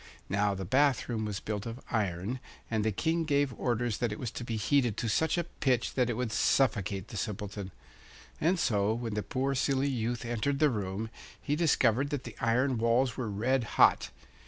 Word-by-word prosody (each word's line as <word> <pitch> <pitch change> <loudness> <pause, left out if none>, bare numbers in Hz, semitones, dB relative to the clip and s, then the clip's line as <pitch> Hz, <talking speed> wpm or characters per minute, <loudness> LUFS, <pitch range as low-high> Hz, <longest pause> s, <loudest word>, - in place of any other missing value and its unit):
Now 100 +1 +1
the 95 0 -5
bath 135 +5 +3
room 110 -3 -2
was 105 -2 -3
built 105 0 -4
of 115 +2 -6
iron, 105 +2 -1 0.3
and 110 -2 +1
the 110 - +1
King 165 - 0
gave 145 -3 +1
orders 120 -1 -1
that 120 -3 0
it 105 - -4
was 120 -4 -4
to - - -6
be 115 -1 -3
heated 120 0 +2
to 115 - -1
such 160 +11 +1
a 175 - +1
pitch 130 -7 0
that 125 -2 +1
it 120 - -1
would 125 -1 -2
suffocate 105 -6 +1
the 110 - -6
Simpleton. 100 -1 -4 0.7
And 175 +4 +2
so 105 -7 +1
when 115 -2 -4
the 105 - -1
poor 130 +7 -1
silly 135 +1 +1
youth 120 -1 -2
entered 120 +4 -1
the 150 -1 +4
room, 105 0 -3 0.3
he 145 - -1
discovered 140 -5 +3
that 145 -3 -3
the - - -9
iron 125 +1 +2
walls 115 +1 +2
were 120 -4 -3
red 120 +6 +1
hot. - - +5
120 Hz, 200 wpm, -30 LUFS, 105-135 Hz, 0.7 s, hot